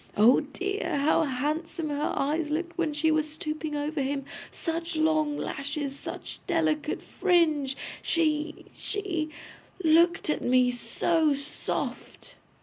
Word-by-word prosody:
'Oh 225 Hz, +5 st, +7 dB
dear! 375 Hz, +6 st, -2 dB
How 300 Hz, +3 st, +3 dB
handsome 305 Hz, +4 st, -2 dB
her 290 Hz, 0 st, -1 dB
eyes 300 Hz, +2 st, 0 dB
looked 340 Hz, +3 st, -2 dB
when 335 Hz, -3 st, 0 dB
she 310 Hz, +2 st, +2 dB
was 310 Hz, 0 st, +1 dB
stooping 310 Hz, 0 st, -4 dB
over 295 Hz, +1 st, -1 dB
him! 275 Hz, 0 st, -1 dB, 0.2 s
Such 330 Hz, 0 st, -3 dB
long 310 Hz, -2 st, +2 dB
lashes, 280 Hz, 0 st, -3 dB
such -, -, -7 dB
delicate 315 Hz, -4 st, 0 dB
fringe! 310 Hz, -7 st, +2 dB, 0.2 s
She 310 Hz, -1 st, 0 dB
she 360 Hz, -7 st, -2 dB, 0.5 s
looked 335 Hz, +2 st, +4 dB
at 305 Hz, -, 0 dB
me 250 Hz, 0 st, +4 dB
so 290 Hz, +6 st, +2 dB
soft. 280 Hz, +1 st, -4 dB
310 Hz, 125 wpm, -28 LUFS, 285-330 Hz, 0.5 s, Oh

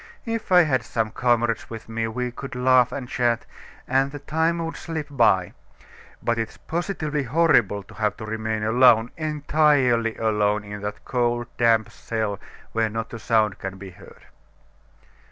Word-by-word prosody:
If 230 Hz, -3 st, -4 dB
I 180 Hz, -1 st, +8 dB
had 130 Hz, -6 st, +1 dB
some 115 Hz, -2 st, -2 dB
comrades 120 Hz, -1 st, +1 dB
with 115 Hz, -1 st, -8 dB
me, 115 Hz, 0 st, -2 dB
we 125 Hz, +2 st, -3 dB
could 135 Hz, +2 st, -8 dB
laugh 125 Hz, -1 st, +4 dB
and 125 Hz, -1 st, -5 dB
chat, 120 Hz, -2 st, 0 dB, 0.4 s
and 135 Hz, +1 st, +2 dB
the 145 Hz, -, -6 dB
time 160 Hz, +4 st, 0 dB
would 165 Hz, -, -5 dB
slip 165 Hz, -5 st, -5 dB
by; 115 Hz, -9 st, +3 dB, 0.7 s
but 120 Hz, -1 st, 0 dB
it 115 Hz, -1 st, -2 dB
is -, -, -17 dB
positively 160 Hz, -4 st, -3 dB
horrible 125 Hz, -, +2 dB
to -, -, -16 dB
have 105 Hz, -1 st, -1 dB
to 110 Hz, -, -7 dB
remain 110 Hz, 0 st, -3 dB
alone, 115 Hz, 0 st, +5 dB
entirely 145 Hz, -6 st, +2 dB
alone, 105 Hz, -2 st, +1 dB
in 105 Hz, 0 st, -8 dB
that 105 Hz, 0 st, -6 dB
cold, 120 Hz, -1 st, -1 dB
damp 115 Hz, -2 st, +3 dB
cell, 110 Hz, -3 st, -3 dB, 0.3 s
where 115 Hz, -1 st, +1 dB
not 115 Hz, +1 st, -5 dB
a 115 Hz, -, -6 dB
sound 110 Hz, -3 st, +1 dB
can 95 Hz, 0 st, -6 dB
be 95 Hz, 0 st, -9 dB
heard." 90 Hz, -, -16 dB
120 Hz, 165 wpm, -24 LUFS, 110-140 Hz, 0.7 s, I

